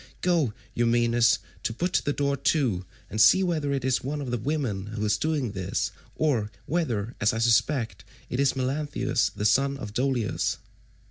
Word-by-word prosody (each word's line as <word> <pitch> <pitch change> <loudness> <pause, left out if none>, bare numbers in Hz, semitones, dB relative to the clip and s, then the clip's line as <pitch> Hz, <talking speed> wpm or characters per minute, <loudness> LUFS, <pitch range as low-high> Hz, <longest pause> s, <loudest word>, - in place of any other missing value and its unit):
Go, 170 -9 +2 0.2
Eumaeus, 120 0 +3 0.4
put 180 +1 +1
the 145 - +1
door 140 -1 0
to, 130 - +1 0.2
and 110 +2 -1
see 190 - +7
whether 155 -6 0
it 135 -2 -1
is 130 -1 +1
one 145 +3 -3
of 135 -4 -4
the 120 - -1
women 120 -8 -2
who 105 0 -3
is 105 0 +2
doing 145 -1 -1
this, 95 -1 -2 0.2
or 125 -9 +1 0.2
whether, 120 -9 -1
as 105 - +3
I - - -2
suspect, 115 +2 +1 0.2
it 125 - -3
is 140 -1 +3
Melanthius 140 +3 0
the 105 - -5
son 135 +6 +3
of 105 -6 -7
Dolius." 125 -2 0
130 Hz, 170 wpm, -26 LUFS, 110-145 Hz, 0.4 s, see